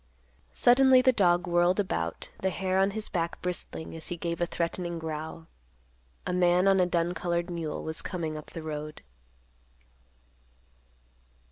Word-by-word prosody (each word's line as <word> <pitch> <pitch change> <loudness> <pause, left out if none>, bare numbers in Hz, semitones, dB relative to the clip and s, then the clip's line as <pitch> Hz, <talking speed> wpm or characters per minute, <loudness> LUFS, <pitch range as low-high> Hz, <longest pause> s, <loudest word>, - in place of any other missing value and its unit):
Suddenly 255 +1 +6
the 260 - +6
dog 175 -5 +3
whirled 175 +2 +2
about, 200 - -2
the 190 - +1
hair 190 0 0
on 195 +1 +4
his 215 +2 -3
back 170 -2 -2
bristling 180 -2 -4
as 160 - -6
he 175 - -4
gave 170 0 -3
a 175 - +2
threatening 170 0 -2
growl. 160 0 -5 0.8
A - - -2
man 180 +1 +3
on 195 -1 +5
a 180 - +4
dun 175 0 0
colored 175 0 -2
mule 165 -3 -4
was 160 0 -2
coming 160 -4 -4
up 155 - -8
the 165 - -7
road. 150 - -6
175 Hz, 150 wpm, -28 LUFS, 165-185 Hz, 0.8 s, Suddenly